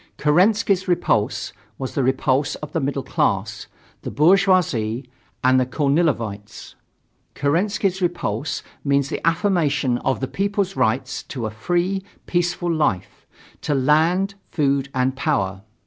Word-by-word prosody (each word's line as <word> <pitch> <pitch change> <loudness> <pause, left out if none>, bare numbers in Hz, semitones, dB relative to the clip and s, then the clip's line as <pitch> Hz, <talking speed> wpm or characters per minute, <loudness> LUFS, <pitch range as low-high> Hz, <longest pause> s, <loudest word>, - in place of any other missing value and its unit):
Kerensky's 190 +5 +2
repulse 175 -1 0 0.2
was 130 -1 -5
the 135 - 0
repulse 130 +2 +1
of 150 -1 -8
the 165 - -1
middle 140 -1 -2
class, - - -1 0.3
the - - -5
bourgeoisie 155 - +2 0.4
and 130 0 +5
the 130 - +2
Kornilovites. 130 -8 -1 0.6
Kerensky's 190 +6 0
repulse 160 - -2 0.2
means 140 -1 +1
the - - -4
affirmation 160 - +1
of 135 - -1
the 135 - -2
people's 200 +1 -1
rights 130 +4 0
to 125 -5 -6
a 110 - -3
free, 175 - -1 0.2
peaceful 175 0 0
life, 150 - -1 0.3
to 145 - -1
land, 160 +8 +2 0.2
food 140 -3 0
and 130 +1 +1
power. 95 -7 -1
145 Hz, 125 wpm, -22 LUFS, 130-180 Hz, 0.6 s, and